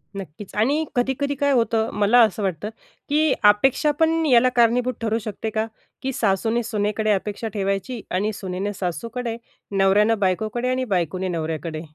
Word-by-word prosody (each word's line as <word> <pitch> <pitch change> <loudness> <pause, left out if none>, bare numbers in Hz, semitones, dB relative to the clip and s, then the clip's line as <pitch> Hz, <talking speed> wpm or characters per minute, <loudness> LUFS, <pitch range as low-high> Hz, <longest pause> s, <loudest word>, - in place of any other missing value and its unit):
नक्कीच. 190 +1 -9
आणि 280 +9 +2
कधी-कधी 265 +3 0
काय 285 +1 +1
होतं 230 -3 +1
मला 210 +4 +5
असं 215 -2 +2
वाटतं, 190 +1 -2 0.4
की 305 -1 +3 0.2
अपेक्षा 270 +7 +1
पण 325 0 +2
याला 255 -3 +5
कारणीभूत 245 +2 +3
ठरू 225 0 0
शकते 215 0 -5
का? 220 +1 -1 0.4
की 270 0 -2
सासूने 225 +3 0
सुनेकडे 215 -1 -1
अपेक्षा 205 +3 -2
ठेवायची 195 +4 -2
आणि 205 +4 0
सुनेने 195 +1 -4
सासूकडे, 230 +6 -4 0.3
नवऱ्यानं 200 +3 +3
बायकोकडे 215 +6 0
आणि 255 0 0
बायकोने 180 +2 -1
नवऱ्याकडे? 160 -2 -3
220 Hz, 145 wpm, -22 LUFS, 195-245 Hz, 0.4 s, मला